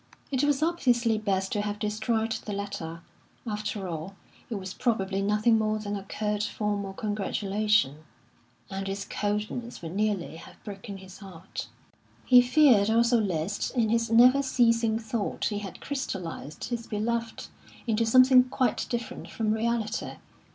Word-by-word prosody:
It 265 Hz, 0 st, +1 dB
was 290 Hz, 0 st, +2 dB
obviously 245 Hz, -9 st, +2 dB
best 195 Hz, -2 st, -1 dB
to 210 Hz, -, 0 dB
have 205 Hz, 0 st, -3 dB
destroyed 220 Hz, +2 st, -1 dB
the 215 Hz, -1 st, -4 dB
letter. 195 Hz, -5 st, -5 dB, 0.4 s
After 210 Hz, -3 st, -3 dB
all, 170 Hz, +3 st, -5 dB, 0.3 s
it 230 Hz, -, -3 dB
was 190 Hz, -1 st, -5 dB
probably 195 Hz, -6 st, 0 dB
nothing 210 Hz, +3 st, +3 dB
more 215 Hz, 0 st, +1 dB
than 205 Hz, -1 st, -4 dB
a 200 Hz, -, -4 dB
curt, 210 Hz, +1 st, -2 dB
formal 205 Hz, -2 st, -2 dB
congratulation, 205 Hz, -4 st, 0 dB, 0.7 s
and 195 Hz, 0 st, -3 dB
its 200 Hz, +1 st, -4 dB
coldness 210 Hz, +2 st, -3 dB
would 165 Hz, +2 st, -6 dB
nearly 200 Hz, -6 st, -1 dB
have -, -, -13 dB
broken 200 Hz, -1 st, -7 dB
his 190 Hz, -1 st, -12 dB
heart. 190 Hz, -3 st, -8 dB, 0.6 s
He 250 Hz, -1 st, +8 dB
feared 245 Hz, -5 st, +5 dB
also 235 Hz, +1 st, +4 dB
lest 190 Hz, +4 st, -2 dB
in 225 Hz, -2 st, +3 dB
his 230 Hz, 0 st, +1 dB
never 250 Hz, +4 st, +6 dB
ceasing 230 Hz, -4 st, +2 dB
thought 225 Hz, -2 st, -3 dB
he 205 Hz, -2 st, -1 dB
had 195 Hz, -4 st, -8 dB
crystallised 185 Hz, -, -5 dB
his 235 Hz, -2 st, -4 dB
beloved 230 Hz, +1 st, -2 dB, 0.4 s
into 230 Hz, -1 st, +1 dB
something 255 Hz, +2 st, +6 dB
quite 255 Hz, 0 st, 0 dB
different 235 Hz, -1 st, -4 dB
from 220 Hz, -2 st, -1 dB
reality. 225 Hz, -1 st, -1 dB
215 Hz, 145 wpm, -27 LUFS, 200-235 Hz, 0.7 s, He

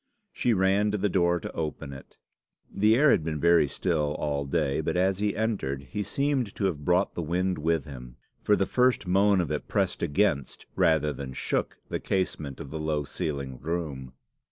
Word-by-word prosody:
She 120 Hz, -2 st, +1 dB
ran 95 Hz, +2 st, +3 dB
to 105 Hz, -, 0 dB
the 105 Hz, +1 st, 0 dB
door 85 Hz, -1 st, +2 dB
to -, -, -6 dB
open 75 Hz, -3 st, -4 dB
it. 65 Hz, -, -13 dB, 0.6 s
The 105 Hz, +3 st, +4 dB
air 145 Hz, +3 st, +5 dB
had 80 Hz, -, +3 dB
been 75 Hz, -1 st, -3 dB
very 85 Hz, -1 st, +4 dB
still 75 Hz, -2 st, -1 dB
all 70 Hz, -1 st, -2 dB
day, 70 Hz, -1 st, 0 dB
but -, -, -1 dB
as 95 Hz, +1 st, +2 dB
he 105 Hz, -1 st, 0 dB
entered 100 Hz, -12 st, -2 dB
he 105 Hz, -, -2 dB
seemed 130 Hz, +1 st, -1 dB
to 100 Hz, -, -1 dB
have 80 Hz, -6 st, -1 dB
brought 90 Hz, +5 st, +2 dB
the -, -, -3 dB
wind 90 Hz, +2 st, -1 dB
with 80 Hz, -1 st, 0 dB
him, 60 Hz, -4 st, -10 dB, 0.3 s
for 105 Hz, -, +3 dB
the 100 Hz, -, +1 dB
first 125 Hz, -2 st, +2 dB
moan 95 Hz, +2 st, +3 dB
of 85 Hz, -, -1 dB
it -, -, -3 dB
pressed -, -, 0 dB
against 70 Hz, -4 st, 0 dB
rather 75 Hz, -2 st, +3 dB
than 65 Hz, -2 st, -7 dB
shook -, -, -2 dB
the -, -, -2 dB
casement 75 Hz, -7 st, -2 dB
of 70 Hz, -, -8 dB
the 80 Hz, -, -4 dB
low 75 Hz, -1 st, -1 dB
ceiled 70 Hz, -5 st, -5 dB
room. 75 Hz, -6 st, -4 dB
85 Hz, 195 wpm, -27 LUFS, 75-100 Hz, 0.6 s, air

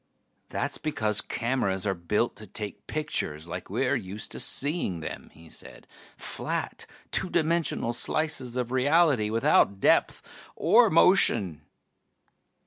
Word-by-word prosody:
"That's -, -, -3 dB
because 110 Hz, -9 st, -1 dB
cameras 110 Hz, -6 st, -1 dB
are 100 Hz, -, +1 dB
built 95 Hz, +6 st, -1 dB
to 110 Hz, -, -8 dB
take 105 Hz, +2 st, -6 dB
pictures 85 Hz, -, -3 dB
like 90 Hz, +2 st, -7 dB
we're 125 Hz, +7 st, 0 dB
used 105 Hz, -3 st, -6 dB
to -, -, -5 dB
seeing 140 Hz, -, -1 dB
them," 80 Hz, -, -7 dB
he 80 Hz, +1 st, -17 dB
said. -, -, -12 dB, 0.3 s
"Flat, -, -, -4 dB, 0.2 s
two 185 Hz, -, 0 dB
dimensional 165 Hz, -7 st, 0 dB
slices 130 Hz, 0 st, -1 dB
of 125 Hz, -1 st, -2 dB
reality, 135 Hz, -3 st, +3 dB
without 110 Hz, -3 st, +3 dB
depth -, -, +2 dB, 0.3 s
or -, -, +5 dB
motion." 85 Hz, -6 st, +4 dB
115 Hz, 125 wpm, -27 LUFS, 95-140 Hz, 0.3 s, or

